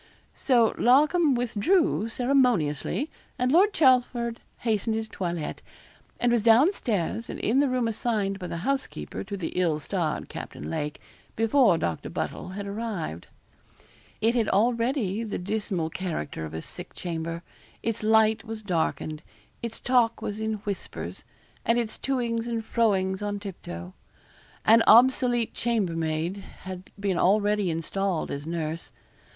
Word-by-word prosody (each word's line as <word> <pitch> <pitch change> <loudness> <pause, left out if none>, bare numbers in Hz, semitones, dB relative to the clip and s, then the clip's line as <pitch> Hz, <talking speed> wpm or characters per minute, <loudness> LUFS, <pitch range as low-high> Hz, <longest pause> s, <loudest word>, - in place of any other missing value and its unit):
So 240 -5 +3
Larcom 295 +4 +4
withdrew 245 - +1
ceremoniously, 245 - +1 0.3
and 250 0 +1
Lord 380 +7 +5
Chelford 245 - +3 0.2
hastened 220 -1 0
his 220 0 -2
toilet, 170 -6 -4 0.6
and 245 - +2
was 235 -2 +3
down 235 - +6
stairs, 220 - -2
and - - -5
in 245 +5 +2
the 285 -1 +3
room 250 -2 +1
assigned 210 -3 -1
by 180 - -5
the 170 - -4
housekeeper 275 0 -2
to 200 0 -5
the 180 - -3
ill 170 -4 +1
starred 160 -1 -2
Captain 75 +2 -7
Lake, 150 - -3 0.4
before 225 -3 +4
Doctor 85 - -2
Buddle - - -4
had 205 - -4
arrived. 200 - -4 0.9
It 225 +2 +3
had 230 -4 +1
already 230 -1 +1
the 220 -3 -3
dismal 190 -4 -2
character 160 - -4
of 80 0 -7
a 80 - -5
sick - - -10
chamber. 165 -1 -4 0.4
Its 230 -1 -2
light 220 0 +4
was 220 -1 -7
darkened; 160 -4 -1 0.4
its 235 -1 -4
talk 245 -2 +2
was 205 +1 -4
in 220 0 -1
whispers; 200 -2 -5 0.4
and 230 - +2
its 230 -2 -2
to 270 -1 0
ings 230 -1 -1
and 230 -2 -2
fro 225 -4 +3
ings 190 +1 -1
on 205 0 -2
tip 200 -3 -8
toe. 85 +2 -7 0.7
An 225 +1 +7
obsolete 240 0 +5
chambermaid 170 -6 -1 0.2
had 185 0 -8
been 195 -3 0
already 205 0 +3
installed 170 +2 -1
as 140 +2 -5
nurse. 165 -1 -3
215 Hz, 145 wpm, -27 LUFS, 180-235 Hz, 0.9 s, An